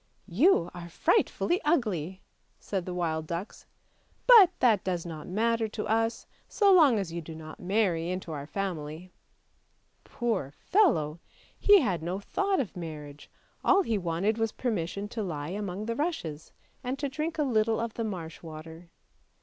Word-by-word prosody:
" -, -, -39 dB
You 300 Hz, -, +5 dB
are 175 Hz, -1 st, -8 dB
frightfully 350 Hz, -, +1 dB
ugly," 195 Hz, -, 0 dB, 0.4 s
said 190 Hz, -3 st, -4 dB
the 180 Hz, -, -3 dB
wild 160 Hz, -3 st, -1 dB
ducks, 170 Hz, +5 st, -6 dB, 0.3 s
" -, -, -39 dB, 0.2 s
but 450 Hz, -8 st, +9 dB
that 225 Hz, -6 st, +4 dB
does 180 Hz, -3 st, -2 dB
not 160 Hz, -3 st, -7 dB
matter 225 Hz, +4 st, +1 dB
to 215 Hz, 0 st, -5 dB
us, 225 Hz, +1 st, 0 dB, 0.2 s
so 405 Hz, -3 st, +4 dB
long 300 Hz, -10 st, +6 dB
as 190 Hz, -5 st, -3 dB
you 170 Hz, -, -3 dB
do 160 Hz, 0 st, -9 dB
not 155 Hz, 0 st, -10 dB
marry 180 Hz, -3 st, 0 dB
into 185 Hz, -2 st, -4 dB
our 145 Hz, -2 st, -5 dB
family! 175 Hz, -2 st, -5 dB, 0.5 s
" -, -, -43 dB
Poor 220 Hz, -, -2 dB
fellow! 165 Hz, -, +2 dB, 0.4 s
he 410 Hz, -2 st, +7 dB
had 190 Hz, -, 0 dB
no 175 Hz, +4 st, -3 dB
thought 395 Hz, -, 0 dB
of 235 Hz, -, -3 dB
marriage, 150 Hz, -4 st, -8 dB, 0.3 s
all 390 Hz, +1 st, +5 dB
he 230 Hz, -, 0 dB
wanted 185 Hz, +6 st, 0 dB
was 225 Hz, -1 st, +1 dB
permission 200 Hz, -4 st, -2 dB
to 190 Hz, -10 st, -4 dB
he 170 Hz, -, -5 dB
among 200 Hz, 0 st, -4 dB
the 230 Hz, +1 st, -2 dB
rushes, 200 Hz, -, -3 dB, 0.3 s
and 255 Hz, +2 st, -2 dB
to 285 Hz, -, -2 dB
drink 310 Hz, +4 st, -3 dB
a 300 Hz, -, +2 dB
little 225 Hz, -4 st, +1 dB
of 230 Hz, -1 st, -3 dB
the 230 Hz, -, -3 dB
marsh 175 Hz, -7 st, -5 dB
water. 160 Hz, +1 st, -10 dB
195 Hz, 170 wpm, -28 LUFS, 165-235 Hz, 0.5 s, but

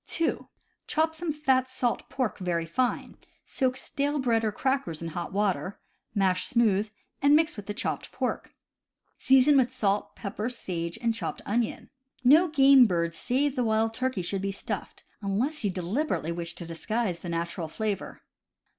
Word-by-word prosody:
(2) 330 Hz, -1 st, -1 dB, 0.4 s
Chop 320 Hz, +1 st, +1 dB
some 325 Hz, 0 st, -3 dB
fat 265 Hz, -4 st, +1 dB
salt 250 Hz, -2 st, -1 dB
pork 255 Hz, -6 st, -2 dB
very 175 Hz, -3 st, -1 dB
fine; 245 Hz, +10 st, -1 dB, 0.3 s
soak 260 Hz, -2 st, 0 dB
stale 290 Hz, +2 st, -1 dB
bread 235 Hz, -4 st, +1 dB
or 215 Hz, -, +1 dB
crackers 265 Hz, -, -1 dB
in 165 Hz, -, -4 dB
hot 175 Hz, +2 st, -5 dB
water, 195 Hz, -1 st, -1 dB, 0.4 s
mash 185 Hz, -2 st, +2 dB
smooth, 220 Hz, -4 st, +2 dB, 0.3 s
and 285 Hz, +1 st, +6 dB
mix 315 Hz, +1 st, +3 dB
with 205 Hz, -3 st, -9 dB
the 205 Hz, -, -2 dB
chopped -, -, -3 dB
pork. -, -, -3 dB, 0.7 s
Season 265 Hz, +2 st, +5 dB
with 255 Hz, -2 st, +3 dB
salt, 205 Hz, -5 st, -1 dB
pepper, 210 Hz, +2 st, -4 dB
sage, 170 Hz, -8 st, -4 dB
and 230 Hz, -1 st, +2 dB
chopped 225 Hz, -, -5 dB
onion. 230 Hz, +2 st, -2 dB, 0.3 s
No 305 Hz, +8 st, +6 dB
game 275 Hz, -4 st, +7 dB
bird 170 Hz, -3 st, 0 dB
save 270 Hz, +8 st, 0 dB
the 250 Hz, -, +1 dB
wild 220 Hz, 0 st, +1 dB
turkey 255 Hz, -5 st, -1 dB
should 190 Hz, +2 st, -2 dB
be 195 Hz, 0 st, -1 dB
stuffed, 195 Hz, -, -5 dB, 0.2 s
unless 235 Hz, +9 st, -1 dB
you 205 Hz, -, +2 dB
deliberately 185 Hz, -, -1 dB
wish 170 Hz, 0 st, -4 dB
to 170 Hz, -, -7 dB
disguise 185 Hz, +3 st, -2 dB
the 175 Hz, -, -7 dB
natural 170 Hz, 0 st, -3 dB
flavor. 210 Hz, +3 st, -4 dB
225 Hz, 165 wpm, -27 LUFS, 185-265 Hz, 0.7 s, game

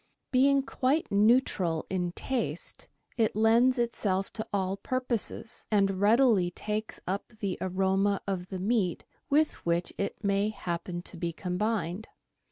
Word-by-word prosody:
Being 275 Hz, +1 st, +4 dB
quite 275 Hz, +4 st, 0 dB
neutral 200 Hz, -6 st, +3 dB
in 180 Hz, -2 st, -2 dB
taste, 260 Hz, +3 st, -3 dB, 0.3 s
it 220 Hz, -4 st, +2 dB
lends 230 Hz, +4 st, +4 dB
itself 200 Hz, -5 st, -1 dB
to 220 Hz, -1 st, -4 dB
all 190 Hz, -1 st, 0 dB
purposes, 245 Hz, -1 st, -3 dB
and 195 Hz, -2 st, +2 dB
readily 215 Hz, -4 st, +4 dB
takes 210 Hz, +4 st, -4 dB
up 195 Hz, +5 st, -3 dB
the 195 Hz, -4 st, -1 dB
aroma 190 Hz, +1 st, +1 dB
of 185 Hz, -2 st, -3 dB
the 190 Hz, -, -5 dB
meat 190 Hz, -2 st, 0 dB, 0.2 s
with 305 Hz, +2 st, +2 dB
which 170 Hz, +1 st, 0 dB
it 200 Hz, +2 st, -3 dB
may 200 Hz, +1 st, +2 dB
happen 175 Hz, -3 st, -4 dB
to 180 Hz, -, -9 dB
be 170 Hz, 0 st, -2 dB
combined. 190 Hz, +2 st, -2 dB
200 Hz, 135 wpm, -29 LUFS, 185-230 Hz, 0.3 s, Being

